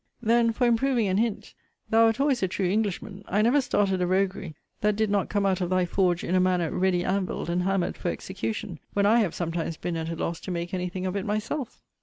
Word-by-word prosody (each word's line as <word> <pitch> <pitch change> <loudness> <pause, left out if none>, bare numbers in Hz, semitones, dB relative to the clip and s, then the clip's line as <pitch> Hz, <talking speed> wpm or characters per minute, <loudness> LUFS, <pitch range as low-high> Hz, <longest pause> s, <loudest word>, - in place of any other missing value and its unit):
Then 230 0 +3
for 245 +3 0
improving 240 -1 +2
an 190 0 +1
hint, 225 -1 -1 0.4
thou 225 +1 +6
wert 225 +2 0
always 275 -3 +2
a 190 - +2
true 190 +1 -2
Englishman. 200 0 -2
I 205 +3 +2
never 260 +6 +4
started 195 -6 +1
a 180 - +1
roguery, 190 -3 -1 0.2
that 210 0 +2
did 215 -1 0
not 200 -2 +1
come 205 -1 0
out 190 -1 +1
of 175 - -1
thy 185 -1 +2
forge 180 -1 +1
in 175 - -2
a 185 - +4
manner 180 -3 +1
ready 180 -1 +1
anvilled 185 -2 -1
and 175 +1 +1
hammered 190 -1 0
for 175 - -2
execution, 190 -1 -4
when 200 0 +2
I 225 +3 +5
have 195 -7 0
sometimes 165 -2 -3
been 175 - -3
at 160 0 -3
a 165 - -3
loss 165 +1 -3
to - - -8
make 175 0 -3
any 180 -1 -1
thing 185 +1 -5
of 185 +1 -2
it 200 - -1
myself. 220 +5 -3
195 Hz, 240 wpm, -26 LUFS, 180-215 Hz, 0.4 s, thou